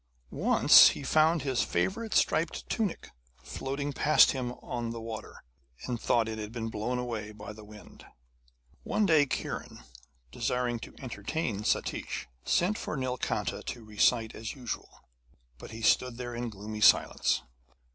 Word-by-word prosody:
Once - - +7
he - - -5
found 155 +1 +3
his 130 -3 0
favourite 225 +3 -1
striped 165 +1 +1
tunic 215 -6 -2 0.3
floating 140 +2 -4
past 150 +1 +5
him 125 -2 -3
on 120 -2 -5
the 115 0 -5
water, 115 -1 -8 0.4
and 120 -2 -3
thought 115 -2 +2
it 110 -1 -5
had 105 0 -6
been 115 -1 -4
blown 115 +3 -2
away 115 -4 -4
by 105 0 -9
the 110 0 -12
wind. 105 0 -14 0.8
One 215 - 0
day 155 -5 +4
Kiran, - - -5 0.5
desiring 125 -1 -1
to - - -11
entertain 115 -1 -3
Satish, - - -2 0.2
sent 195 +5 +1
for 155 - -4
Nilkanta 130 -1 -2
to 120 -3 -7
recite 110 +2 +2
as 110 +4 -6
usual, 125 -4 -7 0.6
but - - -10
he 115 0 -8
stood 125 +1 +3
there 120 -1 -5
in 120 0 -3
gloomy 105 +1 -7
silence. - - +4
120 Hz, 145 wpm, -29 LUFS, 110-140 Hz, 0.8 s, Once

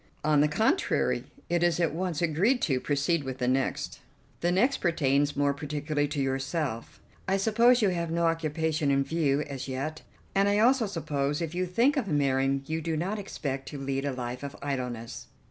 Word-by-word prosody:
"On 150 -1 +4
the 150 - +4
contrary, 220 - +1 0.2
it 175 0 +1
is 175 -1 +2
at 165 -4 +1
once 175 -1 -2
agreed 185 - +2
to. 135 -4 +2
Proceed 145 +4 0
with 130 -1 -5
the 125 - -1
next." 130 +1 -1 0.4
"The 175 - +1
next 245 +10 +3
pertains 145 -4 +1
more 145 0 +2
particularly 145 0 -2
to 145 0 -4
yourself. 135 -1 -2 0.3
I 190 +1 +2
suppose 230 +4 +4
you 200 - +4
have 170 -2 -2
no 170 +1 +1
occupation 160 -2 0
in 140 0 +3
view 150 -2 +1
as 140 -3 -5
yet, 140 +4 -4 0.3
and 200 +1 +3
I 205 - +2
also 235 +1 +4
suppose, 150 -6 -2
if 165 -1 -3
you 180 +1 -1
think 240 - +2
of 250 -7 0
marrying, 135 -3 +1
you 160 +2 -2
do 160 0 -2
not 195 +7 -2
expect 135 -9 -4
to 145 - -7
lead 135 0 -2
a 140 - -1
life 125 -1 -5
of 140 -1 -6
idleness." 125 -5 -4
150 Hz, 190 wpm, -28 LUFS, 140-175 Hz, 0.4 s, On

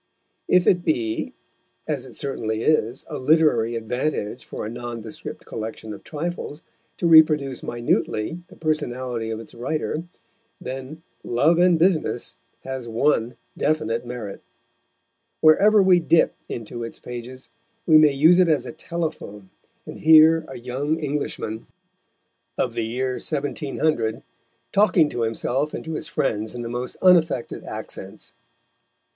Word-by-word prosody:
If 180 -1 +4
it 175 -1 +3
be, 115 -9 -1 0.6
as - - -3
it - - -14
certainly 110 -5 -3
is, 135 -5 +1
a - - -5
literary 130 -6 +3
advantage 115 0 -2
for - - -6
a - - -3
nondescript 120 -2 -7
collection 110 -1 -6
of 100 - -11
trifles, 165 -1 -5 0.3
to - - -2
reproduce 155 -5 +5
minutely 120 +4 -1
the - - -16
personality 125 -7 -2
of 110 -1 -3
its 115 - -11
writer, 150 +6 -2 0.6
then 135 +5 -7 0.2
Love 150 +8 +2
and 175 -1 +5
Business 160 -7 +1 0.3
has 130 -2 -5
one 115 0 +1 0.2
definite 120 -7 0
merit. 120 -5 -7 1.0
Wherever 200 +7 +6
we 185 -2 +5
dip 165 0 +3 0.2
into 120 +1 -6
its 115 - -7
pages 125 +1 -9 0.4
we 155 -2 +7
may 155 -1 +6
use 160 +6 +5
it 180 - +5
as 155 -3 +2
a - - -6
telephone, 155 - -5 0.3
and - - -9
hear 160 0 +6
a 135 - -8
young 130 +6 -2
Englishman, 145 -7 -4 0.9
of - - 0
the 115 - -2
year 125 +3 -2
1700, 145 -5 -1 0.5
talking 195 -6 +4
to 120 - -4
himself 125 +6 -1
and - - -7
to 160 - -4
his 155 - -3
friends 110 -9 -2
in 120 - -5
the 115 - -5
most 120 +1 -4
unaffected 170 -8 +3
accents. 100 +4 -8
135 Hz, 135 wpm, -23 LUFS, 115-160 Hz, 1.0 s, we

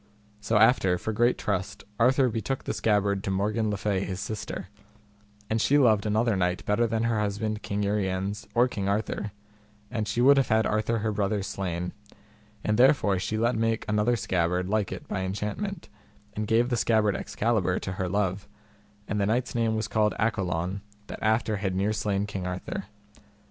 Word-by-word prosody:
So 105 +1 +1
after, 105 -5 +4
for 110 +5 -3
great 120 +3 +2
trust, 100 +1 -3 0.2
Arthur 130 +3 +4
betook 120 +3 -2
the - - -3
scabbard 100 -2 +1
to - - -3
Morgan 105 +3 0
le 105 - -1
Fay 100 -2 0
his 95 -1 -4
sister, 105 -2 -5 0.8
and 110 0 0
she 145 - +4
loved 110 -7 +4
another 110 +1 +2
knight 90 -1 -1
better 115 +3 +2
than 115 0 -1
her 115 -2 +1
husband 105 +1 -2
King 100 +1 -2
Uriens 100 +1 -1
or 120 +2 +5
King 100 -5 -3
Arthur, 105 0 -2 0.6
and 110 -3 -2
she 115 - -2
would 140 +3 +6
have 135 -3 +3
had 110 0 +3
Arthur 110 +2 0
her 110 - +1
brother 105 -1 0
slain, 90 -3 -3 0.7
and 105 +2 +1
therefore 125 -8 +4
she 110 +3 -2
let 120 +2 +1
make 115 0 0
another 105 +3 +2
scabbard 90 -3 0
like 105 -1 0
it - - -7
by 95 - -2
enchantment, 105 - -4 0.5
and 105 0 -3
gave 115 +3 +3
the 120 - 0
scabbard 110 -3 +2
Excalibur 105 -5 0
to 95 - -4
her 95 -1 -3
love; 100 0 -1 0.6
and 105 +1 -1
the 100 - +1
knight's 120 +3 0
name 115 -2 +1
was 110 0 -1
called 105 0 +1
Accolon, 95 -4 -1 0.2
that - - -8
after 110 0 +1
had 95 -1 -2
near 100 +3 +1
slain 100 -2 -1
King 95 -3 -4
Arthur. 90 +1 -4
105 Hz, 180 wpm, -27 LUFS, 100-115 Hz, 0.8 s, would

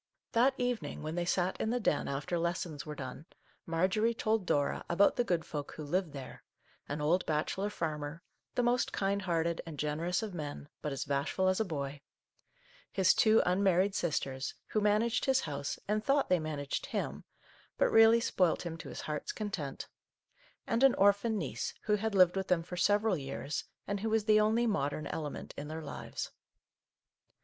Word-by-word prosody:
That 260 +3 +4
evening, 245 -9 -2
when 155 +1 -3
they 175 0 -1
sat 180 +1 0
in 220 - 0
the 245 +2 +1
Den 175 -9 +1
after 140 +5 -2
lessons 170 -3 -2
were 150 - -5
done, 135 +3 -7 0.4
Marjorie 190 +8 +2
told 220 -4 0
Dora 145 -1 +1
about 190 +4 +4
the 245 - +2
good 175 -7 0
folk 145 -2 -5
who 155 - -7
lived 175 +3 -1
there, 135 -2 -9 0.2
— - - -34
an 145 +1 -3
old 170 +5 +2
bachelor 160 +6 0
farmer, 155 -3 -4 0.3
the 245 - +2
most 240 +1 +2
kind 200 +1 0
hearted 170 -2 0
and 165 -3 -8
generous 160 +7 -1
of 210 -3 -5
men, 145 -3 -6
but 150 - -3
as 135 - -3
bashful 145 +7 0
as 185 +2 +2
a 220 - +2
boy; 145 -4 -4 0.9
his 190 -2 +4
two 220 0 +5
unmarried 190 +1 +3
sisters, 140 -6 -2
who 215 - +1
managed 215 +3 +2
his 265 -1 +3
house 140 -2 -3
and 210 +1 0
thought 275 +2 +2
they 180 -1 +4
managed 150 -3 -3
him, - - -3 0.5
but - - +3
really 225 +1 +7
spoilt 180 -7 +1
him 165 -1 -4
to - - -8
his - - -6
heart's 150 -1 -3
content; 185 -10 -4 0.8
and 230 - 0
an 270 - +6
orphan 205 +3 +3
niece, 135 - -3
who 210 - +1
had 220 0 -2
lived 185 -1 +6
with 190 -1 -2
them 175 -2 +2
for 180 - -7
several 205 +3 +3
years, 140 0 -4 0.2
and 200 0 -2
who 220 +3 -1
was 220 -1 +1
the 215 -1 +5
only 220 +3 +3
modern 155 -8 -1
element 150 0 -5
in 145 - -6
their 160 +1 -5
lives. 145 - -6
180 Hz, 185 wpm, -32 LUFS, 150-210 Hz, 0.9 s, really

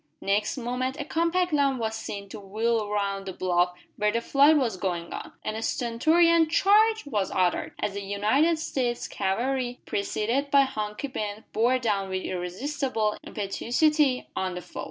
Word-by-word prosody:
Next 210 +5 0
moment 255 +2 -2
a 290 - -3
compact 335 +2 0
line 280 -2 +2
was 220 -2 -2
seen 200 -2 -6
to - - -8
wheel 215 +2 -1
round 200 -1 -2
the 190 - -4
bluff 180 -1 +1 0.2
where 210 0 +2
the 230 - 0
fight 285 +6 +5
was 240 -8 0
going 175 -3 -3
on, - - -7
and 215 - -2
a 220 - -4
stentorian 320 +9 +3
"Charge!" 430 +5 +4
was 210 -9 -1
uttered, 180 -1 0
as 200 - -1
the 200 - -4
United 215 +12 +2
States 255 -6 -2
cavalry, 245 +5 -1
preceded 230 +7 -1
by 280 0 +6
Hunky 215 -1 -2
Ben, 215 -4 -5
bore 240 +3 +3
down 205 -6 -1
with 185 0 -2
irresistible 215 +5 -2
impetuosity 255 +7 +1
on 185 -1 -2
the 180 - -5
foe. - - -10
230 Hz, 165 wpm, -26 LUFS, 200-280 Hz, 0.2 s, by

